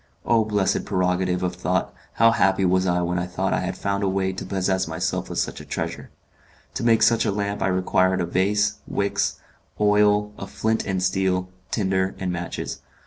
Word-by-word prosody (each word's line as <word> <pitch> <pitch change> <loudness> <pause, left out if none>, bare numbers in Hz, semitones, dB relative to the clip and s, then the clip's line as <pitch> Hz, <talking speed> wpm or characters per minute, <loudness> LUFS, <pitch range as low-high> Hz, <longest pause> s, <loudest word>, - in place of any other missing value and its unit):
O 115 -2 +3
blessed 105 -3 0
prerogative 90 0 0
of 90 -1 -1
thought! 90 0 -1 0.2
how 115 0 +5
happy 95 -3 +2
was 95 +1 +2
I 90 0 +1
when 90 +1 -1
I 90 - -2
thought 95 +2 -1
I - - +1
had 90 0 -3
found 100 0 -1
a 100 - +1
way 95 0 0
to 95 - -6
possess 95 -1 0
myself 80 +2 -2
of - - -5
such - - -2
a - - -9
treasure! - - -5 0.6
To - - -4
make 115 -2 +4
such 115 0 +4
a 105 - +1
lamp 100 0 -2
I - - +2
required 95 0 +2
a 90 - 0
vase, 105 +4 +1
wicks, 100 0 -1 0.4
oil, 105 0 +3
a 95 - -6
flint 110 +3 -1
and 95 -1 -1
steel, 95 -1 0 0.2
tinder, 95 -2 0
and 95 -1 -2
matches. 85 0 -5
95 Hz, 195 wpm, -23 LUFS, 90-105 Hz, 0.6 s, how